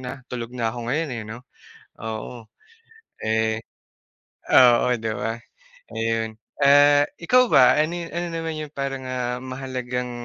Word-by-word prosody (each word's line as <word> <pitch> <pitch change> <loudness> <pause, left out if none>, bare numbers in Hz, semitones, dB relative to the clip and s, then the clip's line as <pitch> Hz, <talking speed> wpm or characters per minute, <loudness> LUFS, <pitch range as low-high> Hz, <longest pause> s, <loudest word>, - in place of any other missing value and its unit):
na 125 +1 -8
tulog 115 -1 -5
na 115 -2 -1
ako 120 0 -6
ngayon, 150 +4 -1
eh, 115 - -4
'no? 120 +3 -9 0.6
Oo, 110 +1 -7 0.8
eh 110 0 0 0.9
oo, 125 -2 +6
di 110 -1 -3
ba? 115 +2 -3 0.6
Ayun, 115 -1 -1 0.2
ah, 145 +1 +6
ikaw 250 +8 +3
ba 130 +4 +6
ano 155 +2 0
yu - - -8
ano 175 +1 -2
naman 165 -1 -3
'yung 150 -1 -7
parang, 135 -1 -3
ah, 125 -1 -2
mahalagang 130 -1 -4
125 Hz, 140 wpm, -23 LUFS, 115-140 Hz, 0.9 s, oo